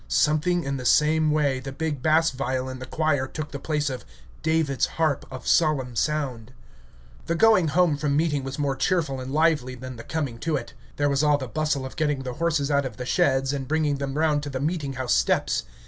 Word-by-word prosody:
Something 160 +3 +2
in 140 0 -2
the 125 - -6
same 155 +4 +3
way 145 -3 +1
the 135 +1 -7
big 150 -1 -3
bass 160 +3 +3
viol 130 -1 -2
in 130 0 -7
the 130 - -8
choir 145 -3 0
took 155 +2 -6
the 140 - -5
place 150 0 -1
of 130 -3 -4 0.4
"David's 160 -4 +1
harp 155 -4 0
of 130 -1 -8
solemn 140 -7 +2
sound." 130 -4 -2 0.7
The 170 - 0
going 215 -3 +5
home 160 0 +3
from 145 -1 0
meeting 150 -3 +1
was 135 +1 -5
more 140 -2 0
cheerful 140 -2 0
and 130 +1 -6
lively 150 -4 +2
than 130 0 -8
the 115 - -8
coming 140 -7 -3
to 160 +3 -1
it. - - -5 0.2
There 145 - +1
was 140 -1 +1
all 150 -1 +4
the 130 -2 -5
bustle 150 0 -1
of 130 - -8
getting 150 -3 0
the 125 -1 -4
horses 150 -2 0
out 140 -1 +2
of 120 - -11
the 125 - -5
sheds 135 +1 +2
and 135 -2 -4
bringing 150 -1 +1
them 140 0 -3
round 155 -2 +2
to 145 - -5
the 135 -1 -4
meeting 150 -1 -2
house 130 -1 -1
steps. - - +1
145 Hz, 220 wpm, -25 LUFS, 130-155 Hz, 0.7 s, going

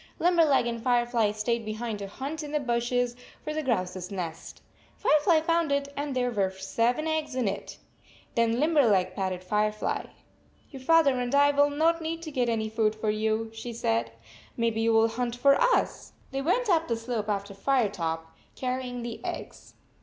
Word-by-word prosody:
Limberleg 330 -7 +4
and 235 -1 -3
Firefly 240 -2 +2
stayed 225 +2 -1
behind 215 0 -4
to 200 - -5
hunt 275 +9 -5
in 295 -1 -7
the 300 - +2
bushes 240 -1 0 0.3
for 305 - -3
the 310 - -1
grouse 190 -10 -1
s 180 -1 -6
nest. 175 -5 -6 0.3
Fire 305 - +4
fly 320 -1 +4
found 330 -1 +1
it, 280 0 0
and 285 -1 -3
there 250 -1 +1
were 200 -4 +1
seven 230 +9 -1
eggs 315 -3 -1
in 250 -4 0
it! 195 0 -4 0.6
Then 230 0 +2
Limberleg 235 - +3
patted 185 -1 -3
Firefly. 210 +2 -1 0.7
"Your 270 -3 -9
father 280 -3 +4
and 245 +2 -1
I 285 0 +6
will 285 0 +4
not 325 +3 +2
need 325 +1 -4
to 315 - -6
get 250 -4 0
any 220 -1 0
food 220 -1 +1
for 215 0 -1
you," 220 +1 -1
she 230 +2 -6
said. 115 - 0 0.2
" - - -24
Maybe 230 -1 0
you 230 0 +3
will 225 0 +5
hunt 235 +1 -2
for 275 +3 +5
us." - - +1 0.2
They 270 0 -2
went 405 - +1
up 330 -4 +2
the 230 - 0
slope 225 -2 -3
after 200 0 -2
Firetop, 195 -8 0 0.3
carrying 250 -1 -3
the 235 -1 -6
eggs. - - -7
240 Hz, 185 wpm, -27 LUFS, 215-285 Hz, 0.7 s, I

